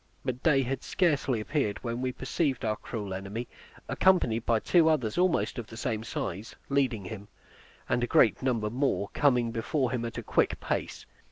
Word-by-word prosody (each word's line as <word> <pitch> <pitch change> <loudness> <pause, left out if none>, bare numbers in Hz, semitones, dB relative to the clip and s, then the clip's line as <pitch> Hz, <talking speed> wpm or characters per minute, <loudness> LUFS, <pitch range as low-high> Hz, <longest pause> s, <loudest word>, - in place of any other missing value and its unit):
But 130 -1 -2
day 140 -4 +4
had 130 +1 -3
scarcely 140 -9 +1
appeared 105 -3 -1
when 120 0 -3
we 130 0 0
perceived 135 0 -1
our 110 -1 +1
cruel 105 -3 -5
enemy, 100 +5 -5 0.4
accompanied 125 -12 +2
by 115 -2 +3
two 165 +6 +4
others, 130 -9 +1
almost 180 -7 +1
of 115 - -6
the 110 - -10
same 110 -1 -2
size, 105 -2 -5
leading 130 -8 +1
him; 100 +1 -7 0.6
and 120 0 +1
a - - +1
great 115 - +4
number 115 -5 0
more 125 -5 0
coming 125 -5 +2
before 125 +3 -1
him 125 -2 -2
at 115 -1 -5
a - - -4
quick - - +1
pace. - - -3
120 Hz, 180 wpm, -29 LUFS, 110-135 Hz, 0.6 s, day